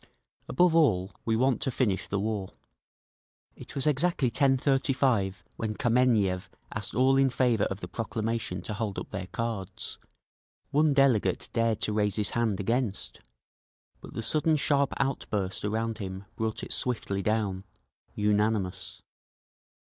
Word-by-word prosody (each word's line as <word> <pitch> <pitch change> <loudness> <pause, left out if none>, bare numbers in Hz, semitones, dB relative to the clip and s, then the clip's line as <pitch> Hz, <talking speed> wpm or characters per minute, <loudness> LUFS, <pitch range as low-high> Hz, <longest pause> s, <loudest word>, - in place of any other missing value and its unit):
Above 175 +5 +4
all, 105 - +3
we 115 - +2
want 130 +2 +2
to - - +1
finish 115 -7 0
the 100 - -1
war…." 100 -2 -2 1.1
It - - -11
was 135 - 0
exactly 150 -3 +2
10:35 130 - +2
when 110 -1 -2
Kameniev 115 -7 +2 0.2
asked 105 -2 -4
all 130 +2 +4
in 135 0 +4
favour 120 -4 +2
of 95 +1 -4
the - - -5
proclamation 115 0 -3
to 105 - -4
hold 105 -2 -3
up - - -6
their 95 -1 -4
cards. 110 -1 -4 0.7
One 150 0 +3
delegate 120 -9 +2
dared 115 -2 +1
to 105 - 0
raise 105 -2 +1
his 105 -1 +1
hand 115 -5 0
against, 115 0 -1 0.8
but - - -12
the 115 - -2
sudden 155 +5 +3
sharp 140 -1 +2
outburst 105 -8 -2
around 110 +2 -1
him 95 -1 -6
brought 110 -1 -2
it - - -3
swiftly 105 -5 -1
down…. 100 -2 0 0.5
Unanimous. 105 -3 0
110 Hz, 140 wpm, -28 LUFS, 100-130 Hz, 1.1 s, Above